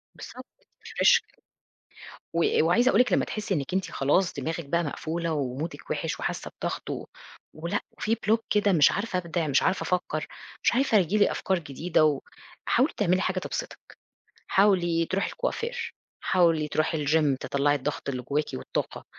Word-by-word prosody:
بالضبط - - -10 0.2
وتrefresh - - +2
كده. - - -31 0.9
و 170 -1 +2
وعايزة 235 +10 +4
أقُول 230 - +5
لِك 250 - +1
لمّا - - +3
تحسّي 215 -1 -3
إنِك 145 -1 -2
أنتِ 190 0 -1
خلاص 175 +7 +1
دماغِك 165 0 -4
بقى 170 +5 0
مقفولة 165 +2 -3
ومودِك 145 +3 -4
وحش - - -2
وحاسة - - -4
بضغط - - -3
و - - -4 0.5
ولأ 170 +2 -2
وفي 225 +1 -1
block 220 0 +1
كده 205 -1 +3
مش 155 -6 +5
عارفة 200 -2 -2
أبدِع، 170 -2 -2
مش 140 -2 +2
عارفة 190 - +1
أفكّر، 175 -4 -2 0.4
مش - - +3
عارفة 250 -3 +3
ييجي 190 +2 +2
لي 205 - +4
أفكار 190 -2 0
جديدة 160 +1 +1
و 145 -3 +1 0.4
حاولي 265 +6 +2
تعملي 185 -2 +2
حاجة 185 0 0
تبسطِك، - - -7 0.5
حاولي 175 -4 +3
تروحي 190 +3 -1
الكوافير، 485 -1 -3 0.3
حاولي 165 -4 +2
تروحي 155 0 0
الgym، 150 -2 +3
تطلّعي 140 +1 +1
الضغط 145 +1 -4
اللي 130 -2 -2
جواكِ 145 +4 0
والطاقة، 65 - -4
170 Hz, 165 wpm, -27 LUFS, 150-200 Hz, 0.9 s, أقُول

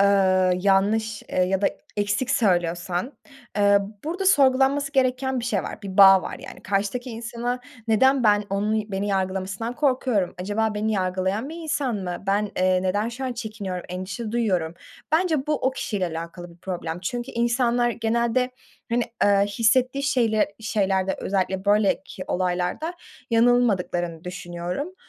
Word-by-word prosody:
eee, 185 -2 +4
yanlış, 210 +3 +2
eee, 185 - -1
ya 190 +1 +1
da - - +5 0.3
eksik 205 +5 0
söylüyorsan, 175 - 0 0.4
eee, 200 0 +5 0.3
burada 355 +5 -2
sorgulanması 275 -2 +4
gereken 260 -1 +1
bir - - -5
şey 215 -6 0
var, - - -7
bir 190 -2 -6
bağ 195 -1 +8
var, - - -5
yani. - - -11
Karşıdaki 205 +6 -2
insana 235 +2 -4 0.3
neden 265 +4 +4
ben, 205 -1 +4
onun 210 +1 -1
beni 195 +2 -1
yargılamasından 195 +4 -2
korkuyorum, 255 - +1
acaba 210 +3 -1
beni 215 +1 0
yargılayan 190 +4 -1
bir 320 - -7
insan 290 -7 -1
mı, 180 -3 -5
ben, 205 +1 +1
eee, 185 0 +2
neden 205 +4 0
şu 245 +3 -6
an 255 - -2
çekiniyorum, 215 -6 -5
endişe 185 +5 -5
duyuyorum? 185 -9 0 0.4
Bence 315 -4 +2
bu 305 - +1
o 265 -2 0
kişiyle 205 -7 -2
alakalı 170 +1 -7
bir 170 - -18
problem 175 -2 -5
çünkü 240 +7 -4
insanlar 240 0 +1
genelde, 235 +2 0 0.4
hani, 240 +1 +2 0.2
eee, 200 0 +4
hissettiği 250 +6 +2
şeyle 225 -7 +1
şeylerde 195 -3 0
özellikle 190 -1 -1
böyleki 200 -2 +1
olaylarda 180 - -1 0.4
yanılmadıklarını 205 -8 +2
düşünüyorum. 180 - -5
210 Hz, 145 wpm, -24 LUFS, 185-245 Hz, 0.4 s, bağ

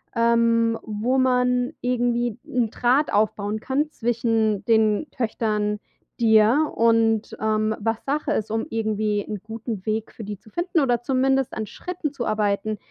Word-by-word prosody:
ähm, 230 0 +3
wo 220 +5 -1
man 250 +1 +2
irgendwie 240 -2 0
'n 245 -3 0
Draht 250 +6 +1
aufbauen 210 0 0
kann 285 +6 -1
zwischen 225 -4 0
den 220 +3 +2
Töchtern, 215 -3 -1 0.4
dir 230 +6 +4
und, 225 -1 +2
ähm, 215 0 +1
was 225 +1 -1
Sache 290 +2 -1
ist, 215 0 -2
um 225 0 -1
irgendwie 215 -2 -1
'n 210 -3 -5
guten 220 -2 -6
Weg 215 0 -2
für 220 - -9
die 205 -1 -6
zu 215 +2 -20
finden 345 - 0
oder 245 -5 +1
zumindest 265 +1 +1
an 220 - -3
Schritten 315 - -5
zu 240 -4 -4
arbeiten, 215 0 0
225 Hz, 150 wpm, -23 LUFS, 215-250 Hz, 0.4 s, dir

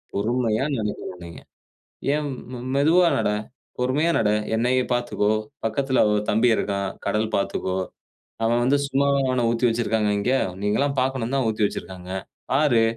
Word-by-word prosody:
பொறுமையா 115 +3 0
நடக்கனும் 105 -4 -4
நீங்க. 85 -2 -10 0.7
ஏம் 150 -1 -1 0.5
மெதுவா 170 +5 +5
நட. 105 - +1 0.5
பொறுமையா 145 +7 +2
நட. 105 - +2 0.3
என்னையே 125 +2 +2
பாத்துக்கோ. 115 -3 0 0.3
பக்கத்துல 130 +3 +2
ஒரு 105 - +2
தம்பி 115 +3 +3
இருக்கான். 100 -1 -1 0.2
கடல் 110 +1 0
பாத்துக்கோ, 95 -1 -1 0.7
அவன் 120 +1 +2
வந்து 140 +3 +3
சும்மாவா 140 0 +2
அவன 125 -2 +1
ஊத்தி 120 +1 +2
வைச்சிருக்காங்க 110 -2 0
இங்க? 125 +6 +1 0.3
நீங்க 105 0 +1
எல்லாம் 140 0 0
பாக்கணும்னு 130 -1 -1
தான் 130 - +1
ஊத்தி 110 -1 +1
வைச்சிருக்காங்க. 95 -2 -6 0.4
பாரு. 135 -5 +4
120 Hz, 140 wpm, -24 LUFS, 105-135 Hz, 0.7 s, மெதுவா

